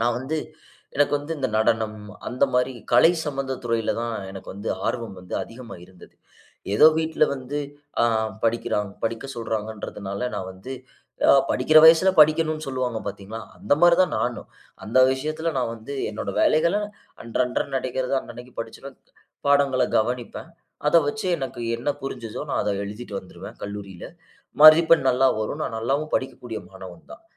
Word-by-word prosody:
நான் 120 +1 +1
வந்து 145 +5 -3 0.6
எனக்கு 145 0 +3
வந்து 145 +3 -6
இந்த 130 - -1
நடனம் 110 -1 +1 0.3
அந்த 125 - +2
மாரி, 125 +1 +1 0.2
கலை 165 +8 +7
சம்பந்த 135 -2 -3
துறையில 115 -2 0
தான் 115 -1 -3 0.2
எனக்கு 95 -1 -10
வந்து 100 +3 -6 0.2
ஆர்வம் 115 -6 -3
வந்து 90 - -8
அதிகமா 115 -4 -10
இருந்தது. 90 0 -17 0.6
ஏதோ 150 - +7
வீட்டில 160 -1 +2
வந்து 135 +2 -5 0.4
ஆ - - +5 0.4
படிக்கிறான் 110 -3 0
படிக்க 115 +3 -2
சொல்றாங்கன்றதனால 110 -1 -4
நான் 95 - -4
வந்து 95 +8 -9 0.6
அ - - +9 0.2
படிக்கிற 155 +5 +5
வயசுல 165 +4 +7
படிக்கணும்ன்னு 155 0 +3
சொல்லுவாங்க 130 -3 -2
பார்த்தீங்களா? 100 +3 -7 0.2
அந்த 105 - -1
மாரி 175 -1 +7
தான் 185 - -1
நானும். 120 -1 -2 0.4
அந்த 110 +6 +1
விஷயத்தில 155 +5 -2
நான் 120 -2 -1
வந்து 115 +5 -9 0.2
என்னோட 105 -2 -4
வேலைகள, 170 +5 +3 0.5
அன்றன்ற 125 +2 -1
நடக்கிறது 130 0 -2
அன்னன்னைக்குப் 120 +1 -12
படிச்சுருவேன். 120 +4 -9 0.5
பாடங்கள 140 -2 +3
கவனிப்பேன். 120 +6 -3 0.4
அதை 170 - +6
வைச்சு 190 +7 -3
எனக்கு 135 -2 -5 0.2
என்ன 120 +5 -4
புரிஞ்சுதோ, 120 -5 -6
நான் - - 0
அதை 105 - 0
எழுதிட்டு 105 +1 -8
வந்துருவேன் 95 - -11
கல்லூரியில. 100 -3 -7 0.6
மதிப்பெண் 155 -2 +8
நல்லா 130 +1 +3
வரும். 110 - -3
நான் 115 - -3
நல்லாவும் 140 +7 -1
படிக்கக்கூடிய 125 -3 -3
மாணவன் 95 -3 -11
தான். - - -13
125 Hz, 145 wpm, -24 LUFS, 110-140 Hz, 0.6 s, அ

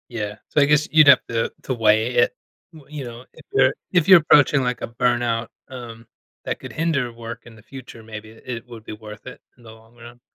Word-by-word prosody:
Yeah, 105 -4 -5
so 150 - +2
I - - +6
guess 150 +1 +2
you'd 155 -2 +6
have 140 - +7
to 115 -1 -1
to 130 - -2
weigh 110 +1 +2
it. 120 - +3 0.4
W 155 -1 -14
you 140 - -4
know, 120 +1 -10
if - - -17
you're 135 0 +4 0.2
if 175 -4 +2
you're 190 -2 +9
approaching, 145 -2 +4
like, 125 0 -2
a - - -3
burnout, 120 -1 -1 0.2
um, 120 -3 -10 0.4
that - - -3
could - - -10
hinder 155 -7 -1
work 115 0 -9
in 120 -2 -14
the 105 - -17
future, 130 -3 -12
maybe 110 0 -10
it 115 +1 -8
would 115 -3 -11
be - - -7
worth 105 +1 -12
it 125 - -10 0.2
in 120 - -21
the 110 - -12
long 110 +1 -19
run. 120 0 -14
120 Hz, 225 wpm, -21 LUFS, 115-135 Hz, 0.4 s, you're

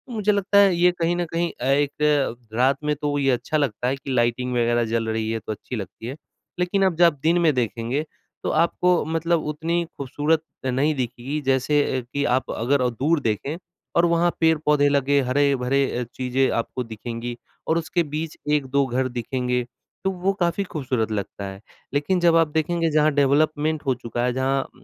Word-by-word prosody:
मुझे 210 -1 +2
लगता 200 0 +1
है, 195 -3 +5
ये 180 +1 +4
कहीं 170 +1 +1
न 175 0 -1
कहीं 170 0 0
अ, - - -2
एक 145 -1 +2 0.2
रात 130 +4 +3
में 150 0 0
तो 145 0 -2
वो 145 - 0
ये 135 -1 +2
अच्छा 125 +6 -1
लगता 125 -4 -1
है 135 - +1
कि 135 0 -7
लाइटिंग 125 +1 +1
वगैरह 120 0 +2
जल 115 0 -1
रही 110 0 -1
है, 115 - -1
तो 110 - -6
अच्छी 110 +4 -6
लगती 105 +1 -7
है। 130 - -5 0.4
लेकिन 180 +2 +1
अब 185 - +1
जब 175 +1 +5
आप 170 - +5
दिन 170 +2 +3
में 160 -3 +4
देखेंगे, 120 +5 -1 0.4
तो - - -1
आपको 170 +2 +2
मतलब 165 +1 0
उतनी 165 +3 -1
खूबसूरत 150 +4 0 0.2
नहीं 135 +4 +1
दिखेगी, 130 +3 -3
जैसे 135 +2 +2 0.2
अ, - - -5
कि 140 0 0
आप 130 -1 0
अगर 125 +2 +1
दूर 145 +7 +1
देखें 125 +7 -1 0.4
और 170 +1 +5
वहाँ 170 +1 +2
पेड़-पौधे 150 -3 +3
लगें, 140 0 +2
हरे-भरे 135 0 +2
अ, - - -1
चीजें 130 +1 +1
आपको 120 +2 -2
दिखेंगी 115 +1 -6 0.3
और 160 - +2
उसके 170 +1 0
बीच 155 0 -4 0.2
1-2 140 -1 +1
घर 130 +1 0
दिखेंगे, 125 +1 -2 0.4
तो 190 - +1
वो 190 +2 0
काफ़ी 175 +2 +1
खूबसूरत 130 - -2
लगता 100 -1 -4
है। 95 +1 -8 0.3
लेकिन 165 +6 +1
जब 170 -1 +4
आप 165 -1 +4
देखेंगे, 165 +2 0
जहाँ 155 0 +3
डेवलपमेंट 150 +2 +2
हो 130 - +2
चुका 120 0 -4
है, 125 - 0
जहाँ 135 +1 0
140 Hz, 190 wpm, -23 LUFS, 125-160 Hz, 0.4 s, है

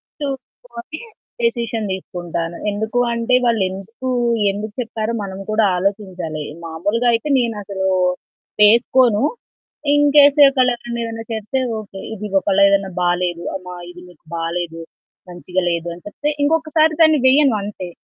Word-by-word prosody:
నేర్చుకొని 265 -1 -8 0.4
డెసిషన్ 230 -2 -1
తీసుకుంటాను. 175 -2 -5
ఎందుకు 220 +4 -2
అంటే 235 +2 +1
వాళ్ళు 230 -3 +2
ఎందుకు 210 +7 -7 0.4
ఎందుకు 205 +1 -6
చెప్పారో 225 -1 -3
మనం 190 0 -7
కూడా 215 0 +3
ఆలోచించాలి. 185 -5 -3 0.2
మామూలుగా 200 +9 -1
అయితే 230 +6 -1
నేనసలు 205 -5 -2 0.7
వేసుకోను. 235 +2 +5 0.7
ఇన్‌కేస్ 290 0 +5
ఒకళ్లెవరైన 240 -3 0
ఏదైనా 225 0 -6
చెప్తే 220 +5 -2 0.2
ఓకే. 200 -2 -10
ఇది 210 0 -6
ఒకళ్ళు 200 0 +1
ఏదన్నా 195 -1 +1
బాలేదు. 175 -1 0
అమ్మా 180 -1 -7
ఇది 175 0 -12
మీకు 165 -3 -21
బాలేదు, 165 0 -3 0.5
మంచిగా 180 +1 -3
లేదు. 170 0 -2
అని 175 - -17
చెప్తే 290 +8 -3
ఇంకొకసారి 315 +1 +2
దాన్ని 315 -2 +6
వెయ్యను 270 -2 +5
అంతే. 200 -3 -6
215 Hz, 125 wpm, -19 LUFS, 185-245 Hz, 0.7 s, దాన్ని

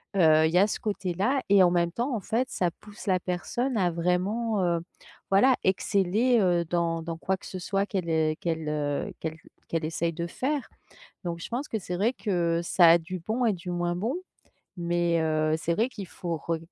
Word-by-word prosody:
heu, 160 -4 +5
il 160 - +1
y - - +4
a 200 +3 +6
ce - - -3
côté-là 205 +4 -1
et 200 -1 +6
en 175 - +4
même 170 -1 +2
temps, 240 +7 -1
en - - -1
fait, 240 +7 -1
ça 180 - 0
pousse 210 0 -12
la 185 -2 +3
personne 235 +9 -2
à 180 -3 +2
vraiment, 190 +6 0
heu, 170 -1 +1 0.5
voilà 250 +7 +5
exceller, 200 +5 +2
heu, 175 -3 +2
dans 165 0 0
dans 165 0 -5
quoi 190 +3 -1
que - - -15
ce 185 - -6
soit 195 +2 0
qu'elle, 185 -5 -3
heu, 155 -1 +2
qu'elle, 160 -2 -2
heu, 145 -1 -2
qu'elle 160 0 -4 0.3
qu'elle 165 -1 -1
essaie 165 +1 -1
de 170 +1 -3
faire. 275 - -2 0.6
Donc, 170 -1 -3
je - - -7
pense 255 +5 -3
que 220 - -2
c'est 180 -2 -5
vrai 215 +7 +1
que 170 -7 0
ça 170 0 +5
a 170 - +7
du 180 +2 -6
bon 220 +8 -1
et 220 - +3
du 180 0 -7
moins 175 0 -1
bon 225 - -1 0.6
mais, 170 -1 +1
heu, 155 0 +1
c'est 165 +1 -1
vrai 225 +6 +1
qu'il 205 -6 -8
faut 170 -2 -4
re 165 +2 -2
180 Hz, 210 wpm, -27 LUFS, 170-205 Hz, 0.6 s, a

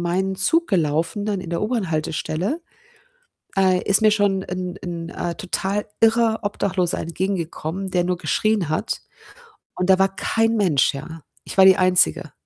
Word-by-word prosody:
meinen 190 +3 -1
Zug 325 - +2
gelaufen 165 +2 0
dann 205 -3 -1
in 170 - -8
der 170 - -2
U-Bahn-Haltestelle, 185 - -2 1.0
äh, 185 -1 +3
ist 200 +1 +3
mir 215 - +6
schon 200 -2 +1
'n 180 0 -5
'n, 170 -1 -5
äh, 170 -1 -4
total 200 0 -2
irrer 225 0 +3
Obdachloser 190 -3 0
entgegengekommen, 180 +1 -3
der 180 -1 +1
nur 180 0 -1
geschrien 215 -2 0
hat, 155 - -2 0.7
und 180 +1 -2
da 190 0 +5
war 195 0 +2
kein 225 +2 +1
Mensch, 165 -10 +2
ja. 160 +3 -8 0.2
Ich - - -8
war 190 - +8
die 190 -1 +7
Einzige 180 - +3
190 Hz, 155 wpm, -22 LUFS, 170-205 Hz, 1.0 s, war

